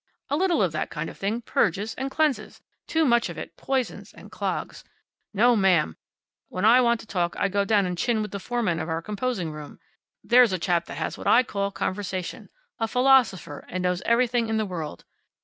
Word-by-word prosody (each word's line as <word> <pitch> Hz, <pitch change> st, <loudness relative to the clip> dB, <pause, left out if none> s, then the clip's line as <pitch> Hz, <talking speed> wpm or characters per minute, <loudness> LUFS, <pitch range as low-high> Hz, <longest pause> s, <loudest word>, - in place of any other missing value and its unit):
A -, -, +3 dB
little 345 Hz, -, +2 dB
of 180 Hz, -, +1 dB
that 155 Hz, -, -3 dB
kind 150 Hz, 0 st, -4 dB
of -, -, -16 dB
thing 210 Hz, +4 st, -1 dB
purges 210 Hz, -1 st, 0 dB
and 270 Hz, +1 st, -4 dB
cleanses. 270 Hz, -6 st, -1 dB, 0.2 s
Too 320 Hz, 0 st, +2 dB
much 235 Hz, -3 st, +3 dB
of -, -, -8 dB
it -, -, -8 dB
poisons, 265 Hz, -2 st, -3 dB
and -, -, -13 dB
clogs. -, -, -4 dB, 0.5 s
No, 235 Hz, +4 st, +4 dB
ma'am! 180 Hz, -, +3 dB, 0.5 s
When 185 Hz, +2 st, -2 dB
I 240 Hz, +3 st, +7 dB
want 235 Hz, -1 st, +2 dB
to -, -, -13 dB
talk 175 Hz, -5 st, -1 dB
I 200 Hz, -, +1 dB
go 200 Hz, +1 st, +1 dB
down 205 Hz, -1 st, +3 dB
and 180 Hz, -1 st, -2 dB
chin 225 Hz, +5 st, 0 dB
with 210 Hz, -, -6 dB
the 200 Hz, -, -4 dB
foreman 220 Hz, -6 st, -1 dB
of 160 Hz, -, -4 dB
our 165 Hz, 0 st, -2 dB
composing 210 Hz, -5 st, -2 dB
room. 150 Hz, -1 st, -10 dB, 0.4 s
There's 240 Hz, -3 st, +5 dB
a -, -, +1 dB
chap 170 Hz, -1 st, 0 dB
that -, -, -7 dB
has -, -, -3 dB
what -, -, -5 dB
I 250 Hz, -, +6 dB
call 200 Hz, -4 st, -2 dB
conversation. 185 Hz, -2 st, -4 dB, 0.3 s
A 225 Hz, -, 0 dB
philosopher, 250 Hz, -, +2 dB
and 185 Hz, 0 st, -3 dB
knows 180 Hz, 0 st, 0 dB
everything 235 Hz, -1 st, +2 dB
in 220 Hz, -, 0 dB
the 215 Hz, -, 0 dB
world. 165 Hz, -, -6 dB
210 Hz, 205 wpm, -25 LUFS, 180-240 Hz, 0.5 s, I